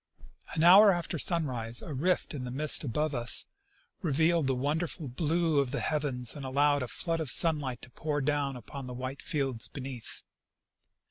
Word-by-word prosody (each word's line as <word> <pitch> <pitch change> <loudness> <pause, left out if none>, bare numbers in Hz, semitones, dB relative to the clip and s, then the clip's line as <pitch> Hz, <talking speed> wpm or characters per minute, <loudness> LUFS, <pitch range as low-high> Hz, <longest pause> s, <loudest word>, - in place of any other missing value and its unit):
An 160 - +1
hour 195 +4 +8
after 175 -2 -2
sunrise 125 -10 0
a 155 - -6
rift 175 +8 0
in 140 -4 -5
the 125 - -5
mist 145 +4 +2
above 150 +4 -1
us 120 -2 +1 0.6
revealed 160 -1 +2
the 135 - +1
wonderful 150 +3 -2
blue 160 +3 0
of 140 -2 0
the 145 - -3
heavens, 135 -6 -1
and 145 - -7
allowed 145 +2 +2
a 125 - -3
flood 165 +6 -2
of 155 -4 -3
sunlight 145 -6 +1
to 125 - -8
jjour 145 -1 -3
down 145 -2 0
upon 130 +2 -8
the 125 - -7
white 130 +2 -6
fields 135 -8 -1
beneath. 130 -4 -8
145 Hz, 175 wpm, -29 LUFS, 130-160 Hz, 0.6 s, hour